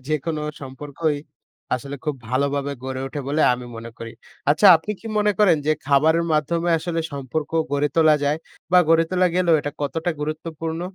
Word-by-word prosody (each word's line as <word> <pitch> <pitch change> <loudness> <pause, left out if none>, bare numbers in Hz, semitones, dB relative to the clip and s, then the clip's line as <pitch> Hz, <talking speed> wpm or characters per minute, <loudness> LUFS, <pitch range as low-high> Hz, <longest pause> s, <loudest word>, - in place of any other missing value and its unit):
যেকোনো 155 +1 -2 0.2
সম্পর্কই 145 +3 -3 0.6
আসলে 140 +3 -5
খুব 150 - -1
ভালোভাবে 140 +2 0
গড়ে 130 0 -4
ওঠে 145 +2 -5
বলে 150 +2 0
আমি 125 0 -5
মনে 115 +1 -8
করি। 115 0 -7 0.4
আচ্ছা 160 +8 +5
আপনি 165 +6 -7
কি - - -10
মনে 210 0 +3
করেন 205 -6 +5
যে, 155 - +4
খাবারের 155 +4 +3
মাধ্যমে 165 +3 +1
আসলে 165 0 -2
সম্পর্ক 140 +2 -4 0.2
গড়ে 145 +1 +2
তোলা 160 -2 +6
যায় 145 +2 +1 0.3
বা 180 - +8
গড়ে 165 0 +5
তোলা 185 0 +3
গেলেও 175 -2 +3
এটা 145 0 -4
কতটা 165 +4 -1
গুরুত্বপূর্ণ? 160 +2 -4
155 Hz, 170 wpm, -22 LUFS, 140-165 Hz, 0.6 s, বা